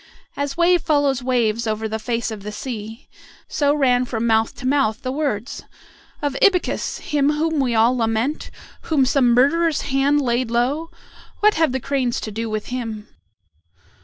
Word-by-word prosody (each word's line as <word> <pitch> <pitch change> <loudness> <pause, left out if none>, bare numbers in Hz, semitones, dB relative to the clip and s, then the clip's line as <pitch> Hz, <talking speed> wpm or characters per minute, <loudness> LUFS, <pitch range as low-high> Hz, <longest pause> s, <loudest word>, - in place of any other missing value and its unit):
As 285 +1 -3
wave 350 0 +4
follows 285 -5 +1
wave 235 -3 0
over 220 0 -2
the 220 0 -4
face 230 0 -2
of 215 -2 -7
the 210 +2 -6
sea, 220 0 -7 0.4
so 285 -2 +1
ran 250 -4 +3
from 235 -2 -3
mouth 225 -1 +2
to - - -9
mouth 270 -3 +1
the 255 - -2
words, 270 -5 -3 0.6
"Of 285 -2 -1
Ibycus! 375 -3 +1
him 290 0 +2
whom 315 0 0
we 250 -4 +1
all 230 +3 +4
lament, 230 +5 -1 0.4
whom 290 -5 +3
some 255 -2 +3
murderer's 310 +5 +3
hand 280 +1 +1
laid 245 -2 0
low! 265 +8 0 0.5
What 425 0 +5
have 320 -4 +2
the 265 - -1
cranes 255 -2 -1
to 215 - -5
do 225 +2 -4
with 215 -1 -4
him?" 225 -4 -5
255 Hz, 165 wpm, -21 LUFS, 225-285 Hz, 0.6 s, What